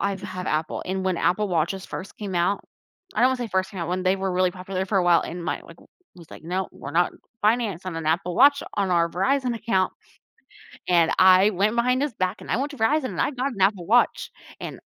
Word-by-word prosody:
I've 200 -1 -2
had 185 -2 -6
Apple 155 +1 -2
and 190 +1 -2
when 185 -2 0
Apple 205 +4 +1
Watches 185 +3 -1
first 195 - -8
came 200 -3 -5
out 175 +4 0 0.5
I - - 0
don't 250 - +6
wanna 260 - 0
say 245 -2 -4
first 190 +1 -1
came 195 - -8
out 170 - -3
when 185 +1 -1
they 185 +1 +2
were 190 -1 -2
really 185 0 +2
popular 185 +1 -4
for 195 +1 -1
a 180 - +1
while 175 -1 +5
and 175 0 -6
my - - -2
like, - - -14
I - - -18 0.3
was, 170 - -15
like, - - -11
"No, 185 +3 -2
we're 140 - -8
not 175 +1 +2 0.3
financed 215 -5 +1
on 185 - -5
an 160 -1 -5
Apple 175 +2 0
Watch 285 +4 +5
on 195 -2 0
our 170 -1 +2
Verizon 250 +7 0
account," 195 -5 0 1.0
and 170 -2 +4
I 185 +2 +6
went 210 +3 0
behind 250 +3 +2
his 290 -4 -2
back 185 +1 -2
and - - -7
I - - +2
went 280 +3 -2
to 280 - -10
Verizon 265 +6 +2
and - - -5
I - - +1
got 265 +1 -2
an 200 - -10
Apple 190 -3 +2
Watch, 240 +3 +2 0.3
and - - -7
190 Hz, 245 wpm, -24 LUFS, 180-220 Hz, 1.0 s, don't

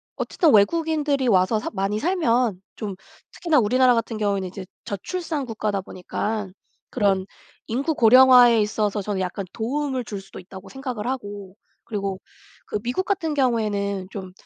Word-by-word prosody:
어쨌든 325 -5 +1
외국인들이 295 +4 +2
와서 195 +1 +3
사 - - -4
많이 200 +1 -1
살면 245 - +1 0.2
좀 205 -3 -5 0.4
특히나 330 -4 +2
우리나라 250 +3 +4
같은 230 -1 -2
경우에는 200 -3 -1
이제 190 +1 -8 0.2
저출산 305 - -4
국가다 210 -4 -2
보니깐 195 +2 -4 0.4
그런 195 -5 +1 0.4
인구 275 +8 -1
고령화에 245 -2 +7
있어서 210 0 -1
저는 200 0 -3
약간 185 +1 -3
도움을 260 +2 -2
줄 200 -2 -6
수도 195 - -12
있다고 190 +1 -12
생각을 255 -5 -5
하고 205 -7 -5 0.3
그리고 200 -3 -4 0.5
그 210 - -2
미국 245 - -2
같은 370 -6 -1
경우에는 210 -7 0
좀 190 -2 -7
220 Hz, 340 characters per minute, -23 LUFS, 200-260 Hz, 0.5 s, 고령화에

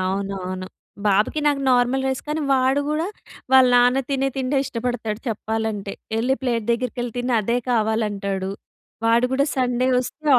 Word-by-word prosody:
అవునవును. 185 -1 -3 0.4
బాబుకి 210 +9 +2
నాకు 285 -1 +2
నార్మల్ 250 +2 +2
రైస్ 265 -1 -1
కానీ 310 +1 -1
వాడు 265 +2 +3
కూడా 315 +3 0 0.5
వాళ్ళ 260 -1 +8
నాన్న 245 +2 +5
తినే 270 -1 +1
తిండే 265 +1 0
ఇష్టపడతాడు 235 -4 -3
చెప్పాలంటే. 220 -2 -3 0.3
ఎళ్ళి 255 +4 +2
ప్లేట్ 235 -3 0
దగ్గరికి 250 +1 -2
వెళ్ళి 240 -2 -3
తిని 245 0 0
అదే 235 +4 0
కావాలంటాడు. 210 -4 0 0.6
వాడు 235 +2 +4
కూడా 275 +2 +2
సండే 250 0 +1
వస్తే 305 +5 -5
245 Hz, 145 wpm, -22 LUFS, 215-265 Hz, 0.6 s, వాళ్ళ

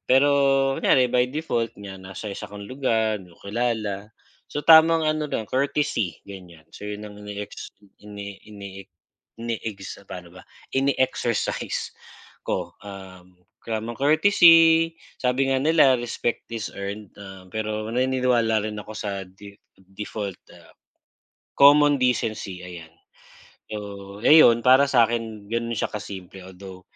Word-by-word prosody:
pero 135 +3 +5 0.5
kunyari 130 -1 +3
by 125 +1 +1
default 120 -8 -2
niya 95 -1 -8
nasa 95 +2 -8
isa 100 - -6
kang 100 0 -9
lugar, 115 -5 0
di 90 -3 -14
mo - - -23
kilala, 105 -2 -3 0.3
so, 145 - -5
tamang 160 0 +6
ano 155 0 0
lang, 110 -7 -4
courtesy 130 - -1
ganyan, 85 -5 -12
so, 105 - -10
yun 105 0 -5
ang 105 -1 -10
ini-ex 105 0 -7 0.3
ini 100 -1 -8
ini-ex 100 -2 -10 0.5
ini-ex 110 -4 -6
paano 90 -2 -10
ba, 90 - -13 0.3
ine-exercise 130 -4 -1 0.5
ko, - - -3
um, 95 -2 -11 0.3
tamang 115 +1 -4
courtesy 165 +1 +5 0.2
sabi 130 +1 +1
nga 135 - +2
nila, 140 -3 +4
respect 120 0 -3
is 110 -3 -4
earned, 100 +1 -6
ah, 95 -2 -11
pero 110 +1 -3
naniniwala 125 -3 +1
rin 105 -1 -5
ako 105 +1 -8
sa 100 -2 -4
di 100 +2 -14 0.2
default, 95 +1 -7 0.2
ah, - - -18 0.9
common 145 +1 +6
decency 115 -7 -1
ayan, 85 -3 -10 0.8
so, 100 -1 -8
ayun 120 -4 +7
para 130 +3 +6
sa 120 -4 +5
akin, 110 -3 -4
ganun 115 0 -2
siya - - -1
ka-simple 95 -3 -8
although, 95 0 -11
110 Hz, 130 wpm, -24 LUFS, 100-130 Hz, 0.9 s, ayun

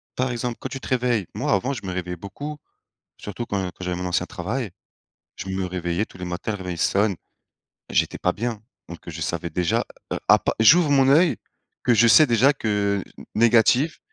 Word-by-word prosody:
par 130 0 0
exemple, 120 0 -3
quand - - -5
tu 135 - -6
te - - -9
réveilles, 125 -5 +1
moi, - - -1
avant, 125 +8 0
je 110 -7 -7
me 95 - -3
réveillais 90 -1 -4
beaucoup, 145 - -7 0.6
surtout 105 +4 -6
quand 100 -3 -2
quand 90 0 -7
j'avais 90 0 -2
mon 90 - -4
ancien 90 0 0
travail. 110 +4 -4 0.7
Je 95 - -7
me 95 0 -2
réveillais 90 +1 -2
tous 95 - -17
les 90 - -5
matins, 90 +5 -4
le 100 - -5
réveil 90 -2 -5
sonne 100 +5 +2 0.8
et - - -9
j'étais - - +1
pas - - 0
bien. 115 -1 -4 0.3
Donc 85 - -8
que 85 - -10
je 80 - -7
savais 85 +2 -3
déjà, 85 +1 0 0.3
heu, - - -2
à - - +6
pa - - -1
j'ouvre 155 +8 +6
mon 135 -2 +4
œil 160 +4 +4 0.5
que 120 - +4
je 115 +1 +5
sais 155 +7 +7
déjà 120 +3 +4
que 105 -5 0 0.2
n - - -11
négatif. 120 +6 +3
105 Hz, 210 wpm, -23 LUFS, 90-125 Hz, 0.8 s, sais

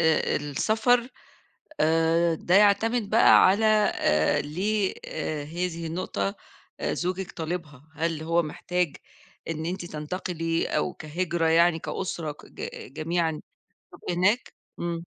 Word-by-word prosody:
آآ، 160 -1 +2
آآ - - +3
السفر 220 - +1 0.7
آآ، 165 +1 +3
ده 175 +3 0
يعتمد 210 +2 +4
بقى 225 - +7
على 200 +4 +3 0.3
آآ، 75 0 +2
ليه 190 +7 -1
آآ، 150 -2 -3
هي 175 +4 -2
دي 165 -1 -6
النقطة 160 - -2 0.5
آآ، - - -1
زوجك 185 +1 -3
طالبها 160 -4 -6
هل 160 0 -2
هو 170 +2 +2
محتاج 175 +1 -2 0.5
إن 160 0 -3
أنتِ 180 0 -3
تنتقلِي 165 +1 -3
أو 180 - -1
كهجرة 165 +2 -2
يعني 165 +1 +4
كأسرة 165 -3 -4
كج 455 - -9
جميعًا 165 -1 -1 0.5
تبقوا 175 - -5
هناك؟ 205 +8 +1 0.3
إمم. 170 0 -3
170 Hz, 125 wpm, -26 LUFS, 160-185 Hz, 0.7 s, بقى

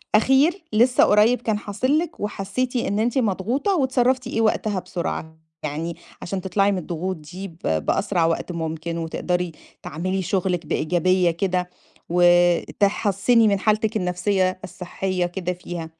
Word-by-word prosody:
أخير 275 - +3
لسه 240 +3 +4
قريّب 215 +4 +4
كان 220 -3 0
حاصل 215 +8 0
لِك 330 0 -3
وحسّيتِ 210 +5 -3
إن 215 -4 0
أنتِ 240 +4 0
مضغوطة، 240 - 0
واتصرفتِ 260 -3 +1
إيه 225 -2 -1
وقتها 215 -3 +1
بسرعة؟ 160 -3 -5 0.3
يعني 155 +3 -3 0.3
عشان 190 +1 -4
تطلعي 195 +2 +1
من 195 - -1
الضغوط 180 +2 -3
دي 175 +6 -8
ب 165 -3 -15 0.3
بأسرع 175 -4 +1
وقت 165 +2 -1
ممكن 165 0 -4
وتقدري 175 +1 -2 0.3
تعملي 185 +5 -2
شغلِك 180 -2 -1
بإيجابية 175 +3 +2
كده، 180 +1 -1 0.4
وتحسّني 195 +5 +3
من 200 -2 +2
حالتِك 215 +1 +1
النَفْسية، 185 0 0
الصحيّة 185 0 -3
كده 180 0 -3
فيها؟ 175 -2 -7
190 Hz, 135 wpm, -23 LUFS, 175-220 Hz, 0.4 s, لسه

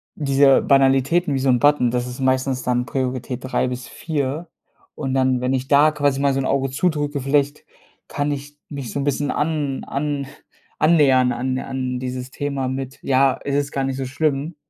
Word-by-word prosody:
diese 140 -2 +4
Banalitäten 135 +4 +3
wie 135 - 0
so 130 0 +1
'n 125 - +4
Button, 145 -4 +4
das 125 0 -1
ist 125 +1 -8
meistens 130 0 +1
dann 125 0 0
Priorität 130 -1 -3
3 130 0 0
bis 125 0 -6
4. 155 +1 -3 0.5
Und 135 -3 -3
dann, 130 -1 +2
wenn 125 +1 0
ich 130 0 -2
da 145 +2 +6
quasi 145 -2 0
mal 140 -1 +2
so 135 - -1
'n 130 - -3
Auge 135 -1 0
zudrücke, 145 -2 -1
vielleicht 145 +2 0 0.4
kann 145 +1 -2
ich 145 +1 -6
mich 140 -5 -6
so 140 - -3
'n - - -1
bisschen 145 0 0
an 150 -3 -1
an 140 -1 -3 0.5
annähern 135 -6 +4
an 130 +1 -2
an 130 -1 -3
dieses 125 0 -5
Thema 140 -2 -3
mit, 135 0 -5
ja, 135 0 +2
es 140 - -2
ist 140 0 -1
gar 135 - -2
nicht 135 0 -3
so 135 - -3
schlimm. 145 +3 -1
135 Hz, 190 wpm, -21 LUFS, 130-145 Hz, 0.5 s, da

